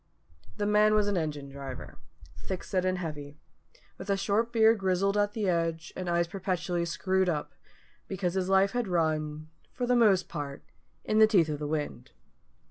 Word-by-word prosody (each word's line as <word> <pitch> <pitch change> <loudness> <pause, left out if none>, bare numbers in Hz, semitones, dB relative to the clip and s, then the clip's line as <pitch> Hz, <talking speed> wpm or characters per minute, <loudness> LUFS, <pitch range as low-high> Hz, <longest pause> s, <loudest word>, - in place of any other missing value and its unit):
_" - - -26
The 205 - -1
man 210 +1 +4
was 210 -1 +3
an 205 - 0
engine 150 -4 -2
driver, 135 -2 -8 0.4
thick 190 -2 -5
set 185 -2 -1
and 185 0 +1
heavy, 150 -4 -6 0.6
with 200 - -8
a 200 - +2
short 205 +4 0
beard 225 -1 +4
grizzled 190 +1 +1
at 205 0 +1
the 210 -3 -1
edge, 165 -2 -1
and 185 -1 -4
eyes 170 0 +2
perpetually 180 -2 -2
screwed 185 +2 0
up, 150 -3 -3 0.5
because 185 -2 -2
his 190 -1 -1
life 195 +1 +4
had 245 -3 -1
run 155 -3 -1 0.2
for 250 - -3
the 250 0 +2
most 205 -6 +4
part 140 -1 -6 0.4
in 215 - +1
the 220 - +8
teeth 180 -8 +3
of 150 -1 -3
the 150 - -3
wind. 145 -5 -4
185 Hz, 185 wpm, -29 LUFS, 155-205 Hz, 0.6 s, the